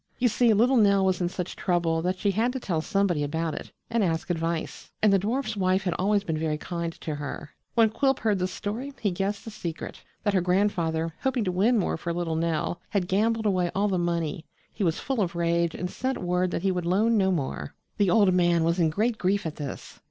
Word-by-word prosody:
You 245 -1 +3
see, 230 +2 +3
little 240 +5 +4
Nell 200 -3 +4
was 185 -1 +1
in 175 - +1
such 180 0 -5
trouble 170 -3 0
that 180 +2 -1
she 200 +2 +1
had 225 +5 +1
to 260 - -3
tell 170 -9 -1
somebody 195 -4 +1
about 160 +2 -2
it - - -7 0.2
and 230 -2 +1
ask 165 0 -1
advice, 165 -1 -3
and 210 -2 +4
the 195 - +5
dwarf's 225 +3 -1
wife 185 0 +1
had 180 -2 0
always 200 +2 +2
been 160 -4 -2
very 155 -1 -1
kind 170 +1 -4
to 155 - -3
her. 145 +1 -6 0.2
When 225 -2 +5
Quilp 270 +3 +2
heard 210 -3 +1
the 180 - +1
story 225 +9 -5
he 205 - 0
guessed 195 +3 -2
the 225 - -6
secret 170 -6 -6 0.2
that 205 -2 +1
her 190 - +3
grandfather, 170 -3 +1
hoping 265 -3 0
to 185 - 0
win 210 +7 +3
more 195 - 0
for 170 +1 -3
little 170 -2 -2
Nell, 165 +1 -1
had 190 -4 0
gambled 220 +4 +1
away 185 -4 +2
all 200 +2 +2
the 185 -2 0
money. 170 -2 -2 0.3
He 210 - -3
was 165 -3 +1
full 265 -5 -1
of 175 -3 -1
rage 170 0 +1
and 180 - -3
sent 260 +8 -2
word 180 +1 0
that 175 - -3
he 195 - +2
would 180 -2 -2
loan 215 +6 +3
no 190 -3 +3
more. 150 -7 -3 0.2
The 200 -3 +3
old 200 -1 +5
man 175 -2 +3
was 170 +2 +1
in 165 -2 +4
great 220 +7 0
grief 195 +1 +1
at 155 - -4
this. 145 -3 -7
185 Hz, 235 wpm, -26 LUFS, 170-210 Hz, 0.3 s, the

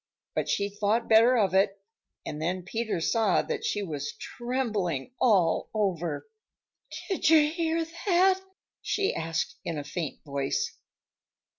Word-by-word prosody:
But - - -1
she 200 - +1
thought 205 +3 0
better 230 +3 +6
of 200 -4 +2
it, 195 +1 +3 0.5
and 150 0 -5
then 180 +3 -1
Peter 220 0 -2
saw 215 +3 +2
that - - -3
she 205 - -1
was 145 -5 -4
trembling 230 - -3
all 190 -9 +3
over. 175 - -1 0.8
"Did 380 -5 +1
you 305 -2 +6
hear 330 0 0 0.2
that?" 375 +1 +4 0.4
she 400 -1 0
asked 165 0 -2
in 165 - -3
a 145 - -3
faint 150 +1 -5
voice. 140 -1 -2
200 Hz, 135 wpm, -28 LUFS, 165-250 Hz, 0.8 s, better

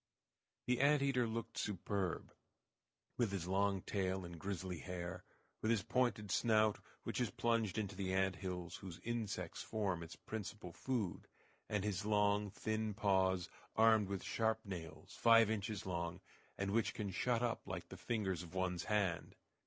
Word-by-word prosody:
The 125 -1 +2
ant 140 +1 +5
eater 125 -4 +3
looked 115 0 -3
superb, 95 -2 -2 0.8
with 115 -5 +2
his 95 -4 -2
long 95 0 +2
tail 95 -2 -1
and 85 -1 -8
grizzly 95 -2 -3
hair; 90 0 -5 0.4
with 110 - +1
his 115 -4 +3
pointed 115 -4 +1
snout, 110 -2 +4 0.2
which - - -1
is - - +1
plunged 115 -4 +1
into 100 -2 -2
the 95 -1 -1
ant 95 -1 +2
hills 90 -2 -4
whose 90 -3 -8
insects 110 -7 -2
form 100 -6 -1
its 85 0 -7
principal 105 -4 -6
food; 115 -7 -2 0.4
and 105 -2 0
his 105 -3 -1
long, 105 -1 +3
thin 110 +1 -2
paws, 95 -3 +3 0.3
armed 110 -2 +6
with 100 -2 -2
sharp 110 0 0
nails, 85 -5 -7
five 115 -2 +7
inches 105 -1 -2
long, 85 -1 -2 0.4
and 100 0 -1
which 115 +1 +1
can 100 -3 -2
shut 120 +5 +1
up 120 -1 -1
like - - -5
the - - -7
fingers 100 -7 -1
of 85 +1 -10
one's 90 -2 0
hand. 100 -5 0
100 Hz, 160 wpm, -38 LUFS, 95-110 Hz, 0.8 s, five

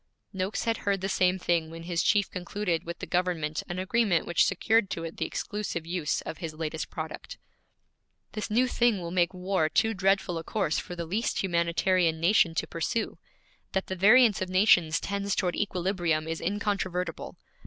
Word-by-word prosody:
Noakes 190 +2 -2
had 230 -2 0
heard 200 -1 -1
the 190 - -1
same 185 -1 +2
thing 170 -3 0
when 165 +1 -9
his 170 -1 -1
chief 205 -2 +3
concluded 180 -1 -2
with 170 0 -5
the - - -6
government 175 -4 -1
an 175 - -4
agreement 190 -1 +1
which 170 - +3
secured 210 +2 +2
to 165 - -4
it 165 0 -7
the - - -1
exclusive 205 -6 -4
use 170 -3 -1
of 160 - -7
his 165 -4 -5
latest 160 0 -4
product. 160 0 -7 0.9
'This 215 - -4
new 245 +4 +3
thing 240 -4 +2
will 170 -1 -5
make 175 -1 +2
war 185 -3 0
too 225 +6 +2
dreadful 190 -3 +1
a - - -7
course 190 -7 -1
for 175 - -7
the 170 -1 -4
least 200 +7 -1
humanitarian 170 -1 +1
nation 170 -1 +3
to - - 0
pursue. 170 +7 -3 0.5
That 190 -1 0
the 190 - -4
variance 215 +3 +5
of 185 - -2
nations 185 -4 +4
tends 200 0 -2
toward 180 -2 0
equilibrium 175 -5 -1
is 165 0 -3
incontrovertible. 185 -3 -2
180 Hz, 180 wpm, -28 LUFS, 165-200 Hz, 0.9 s, variance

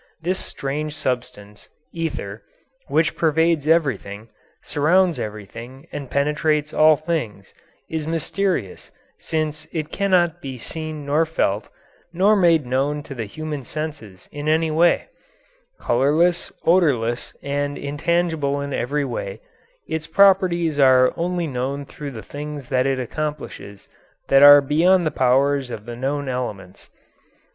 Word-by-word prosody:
This 180 +3 -1
strange 150 +2 -4
substance, 125 -6 -5 0.2
ether, 145 -11 -4 0.5
which 155 +3 +1
pervades 160 -1 +1
everything, 115 - 0 0.3
surrounds 170 +4 +2
everything, 115 - -8
and 140 -3 -6
penetrates 150 +1 0
all 155 0 +6
things, 145 - -4 0.3
is 160 -1 -4
mysterious, 165 - -2 0.3
since 155 -1 -3
it 155 -1 -4
cannot 175 -4 +1
be 135 -4 -6
seen 155 +2 -6
nor 150 +3 +2
felt, 105 -9 -1 0.4
nor 195 +5 +3
made 170 -7 +3
known 140 +4 -1
to 140 - -8
the 115 -4 -4
human 150 +5 -6
senses 145 -10 -7
in 145 +1 -3
any 160 0 +2
way; 170 +3 +3 0.7
colourless, 155 +8 +2
odourless, 135 -10 +1
and 145 0 -2
intangible 150 -1 -1
in 140 0 -4
every 140 +4 -1
way, 100 -6 -5 0.5
its 160 -1 -4
properties 175 -4 +3
are 130 -2 +5
only 175 0 -1
known 140 0 -3
through 145 +1 -8
the 115 -6 -9
things 145 +3 -7
that 130 0 +1
it 135 -1 0
accomplishes 130 -7 -6 0.4
that 135 0 +6
are 145 0 +10
beyond 170 +6 +3
the 155 - 0
powers 135 +1 +2
of 110 -3 -7
the 120 0 -7
known 140 +3 -2
elements. 105 -8 -5
145 Hz, 130 wpm, -22 LUFS, 130-160 Hz, 0.7 s, are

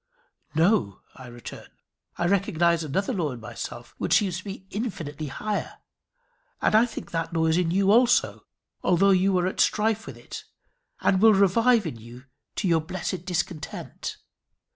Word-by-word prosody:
"No," 160 - +2
I 130 -2 -11
return. 120 -1 -10 0.5
"I 175 - 0
recognize 170 -3 +2
another 195 - -1
law 160 - -1
in 120 - -9
myself 110 - -8
which - - +2
seems 190 -4 -1
to 205 - -13
me 195 -1 -7
infinitely 160 - -4
higher. 210 +9 -3 0.8
And - - +1
I 220 +3 +5
think 225 - -8
that 165 0 -3
law 160 0 +2
is 160 0 +3
in 175 -1 +1
you 195 +3 +3
also, 240 +2 +3 0.3
although 190 +2 +4
you 190 0 +3
are 180 - +1
at 185 - -3
strife 220 +1 +1
with - - -8
it, - - -9 0.6
and 190 -1 +2
will 220 -1 +7
revive 220 +4 +4
in 150 -8 -4
you 120 +3 -12 0.3
to 200 - -1
your 165 -2 +3
blessed 180 +1 -4
discontent. 175 -3 -4
180 Hz, 165 wpm, -25 LUFS, 160-200 Hz, 0.8 s, will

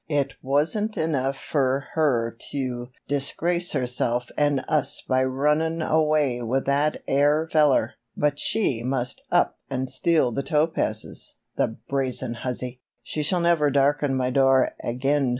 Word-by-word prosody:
"It 140 -3 0
wasn't 160 - 0
enough 140 -4 0
fer 135 -3 0
her 120 -8 +1
tew 125 -3 -3 0.2
disgrace 170 +5 0
herself 125 -2 -1
an' 145 -2 +2
us 150 0 0
by 130 0 +2
runnin' 150 +5 +1
away 155 -6 +2
with 125 +3 -1
that 145 +2 +1
air 145 +3 +3
feller, 145 -7 +3 0.2
but 145 -1 +1
she 140 - 0
must 125 0 -2
up - - +2
an' 130 -1 -2
steal 130 0 +2
the 130 - -2
topazes, 150 -8 -1 0.2
the 110 - -1
brazen 130 -3 -1
hussy! 125 +1 -4 0.2
She 155 - -3
shall 175 +4 +1
never 170 -4 +3
darken 140 0 +2
my 130 -1 0
door 135 0 +4
ag'in! 135 +3 0
140 Hz, 135 wpm, -24 LUFS, 130-150 Hz, 0.2 s, door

